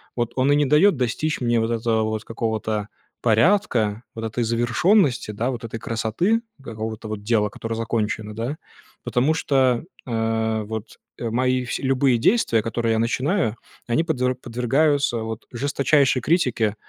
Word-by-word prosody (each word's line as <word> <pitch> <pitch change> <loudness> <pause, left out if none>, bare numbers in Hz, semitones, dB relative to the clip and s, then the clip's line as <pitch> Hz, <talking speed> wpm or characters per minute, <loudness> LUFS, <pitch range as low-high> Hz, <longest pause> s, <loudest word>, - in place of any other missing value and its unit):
вот, 120 -1 -1
он 135 +2 +2
и - - +5
не 145 0 +3
дает 150 +7 +5
достичь 130 +4 -1
мне, 120 -1 +2
вот, 115 +1 0
этого 115 -1 +1
вот 110 0 -2
какого-то 110 -2 -2 0.3
порядка, 115 - +2
вот 115 0 -4
этой 115 +2 -2
завершенности, 120 - +2
да, 115 +5 -1
вот 120 -1 -6
этой 115 0 -5
красоты, 115 - 0 0.2
какого-то, 110 -2 -6
вот, 105 -1 -5
дела, 105 -2 +2
которое 115 +2 -5
закончено, 110 -2 -2
да, 120 +7 -3 0.5
потому 135 +6 +1
что, 130 -5 +2 0.2
э, 110 -1 0
вот, 110 +1 -7 0.2
э, 115 - -2
мои 125 +1 +1
вс - - -2
любые 130 -2 +2
действия, 115 - +2
которые 115 0 0
я 110 - +1
начинаю, 130 - 0 0.3
они 135 +8 +2
подве 130 -6 0
подвергаются, 130 +2 +1
вот, 110 0 -5
жесточайшей 140 +1 +2
критике, 120 - +1
120 Hz, 155 wpm, -23 LUFS, 110-135 Hz, 0.5 s, и